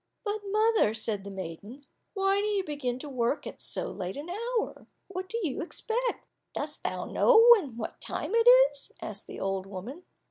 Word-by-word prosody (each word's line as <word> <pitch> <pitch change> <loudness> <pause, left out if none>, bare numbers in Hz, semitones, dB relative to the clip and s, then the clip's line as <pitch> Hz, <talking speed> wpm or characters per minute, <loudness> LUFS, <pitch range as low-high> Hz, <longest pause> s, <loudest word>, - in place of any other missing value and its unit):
"But, 420 -1 -2
mother," 430 - +3
said 215 -2 -2
the 200 - -7
maiden, 195 - -8 0.3
"why 390 0 +2
do 420 - 0
you 405 -2 +1
begin 285 -6 -3
work 255 -1 -1
at - - -8
so - - -3
late 185 +2 -5
an 305 +5 -6
hour? 465 +4 -3 0.2
What 370 0 -5
do 460 - -2
you 300 -7 -2
expect?" 465 +8 -2 0.3
"Dost - - -4
thou - - -2
know 460 -2 +5
then 280 - -4
what 220 - -6
time - - -4
it 460 +1 +4 0.2
is?" 285 -1 -11
asked 205 -2 -8
the - - -8
old 195 0 -2
woman. 205 - -7
295 Hz, 180 wpm, -29 LUFS, -, 0.3 s, know